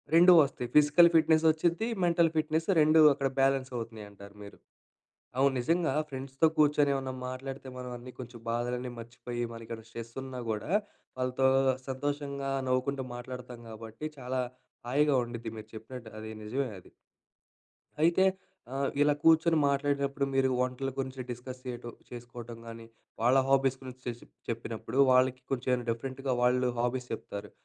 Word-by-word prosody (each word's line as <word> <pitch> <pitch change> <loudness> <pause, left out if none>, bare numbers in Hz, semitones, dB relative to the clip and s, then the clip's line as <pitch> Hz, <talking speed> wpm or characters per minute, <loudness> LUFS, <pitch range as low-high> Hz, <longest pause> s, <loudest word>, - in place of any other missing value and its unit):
2 175 +2 +8
వస్తాయి 135 -4 -1
physical 150 +3 +7
fitness 160 0 +5
వచ్చిద్ది. 170 +6 +1 0.2
Mental 170 -1 +4
fitness 155 +1 0
2 155 +1 +5
అక్కడ 135 0 -1
బ్యాలెన్స్ 135 -1 +2
అవుతున్నాయి 115 -3 -6
అంటారు 100 0 -14
మీరు. 100 - -12 0.8
అవును 140 +1 +4
నిజంగా 165 +4 +1 0.2
ఫ్రెండ్స్‌తో 135 +2 0
కూర్చొని 150 -1 +4
ఏమన్నా 135 -1 -3
మాట్లాడితే, 135 +1 -6
మనం 125 0 -6
అన్నీ 125 +1 -10
కొంచెం 120 -2 -9
బాధలన్నీ 125 +1 -2
మర్చిపోయి, 120 +1 -5
మన 115 - -8
ఇక్కడ 115 0 -6
స్ట్రెస్ 115 0 -8
ఉన్నా 130 -1 -6
కూడా 110 +7 -3 0.5
వాళ్ళతో 130 +1 +1 0.4
సంతోషంగా 140 0 -3 0.2
నవ్వుకుంటూ 130 +1 0
మాట్లాడుతాం 125 -1 -8
కాబట్టి, 110 +4 -9
చాలా 130 0 -2 0.5
హాయిగా 145 +2 +3
ఉండుద్ది. 120 -1 -6
మీరు 110 0 -10
చెప్పినట్టు 115 +1 -9
అది 110 0 -7
నిజమే 130 +4 -2
అది. - - -20 1.1
అయితే 170 +4 +4 0.5
ఆహ్, 135 0 0
ఇలా 145 0 +5
కూర్చొని 165 0 +5
మాట్లాడినప్పుడు, 140 0 0
మీరు 135 0 +3
వంటల 125 +1 -1
గురించి 130 -1 -3
డిస్కస్ 125 +1 -7
చేయటం, 120 -2 -6 0.2
చేసుకోవటం 120 -1 -9
గానీ, 115 0 -9 0.4
వాళ్ళ 125 +3 +5
హాబీస్ 135 -1 +3
గురించి 130 -1 -10
చెస్ 120 -1 -4 0.3
చెప్పినప్పుడు 115 +2 -4
వాళ్ళకి 130 0 +3
కొంచెం 125 -1 0
డిఫరెంట్‌గా 130 +3 -2
వాళ్ళు 125 +1 +3
హాబీస్ 125 +1 -1
చెప్తారు. 105 -2 -7
130 Hz, 140 wpm, -30 LUFS, 120-140 Hz, 1.1 s, 2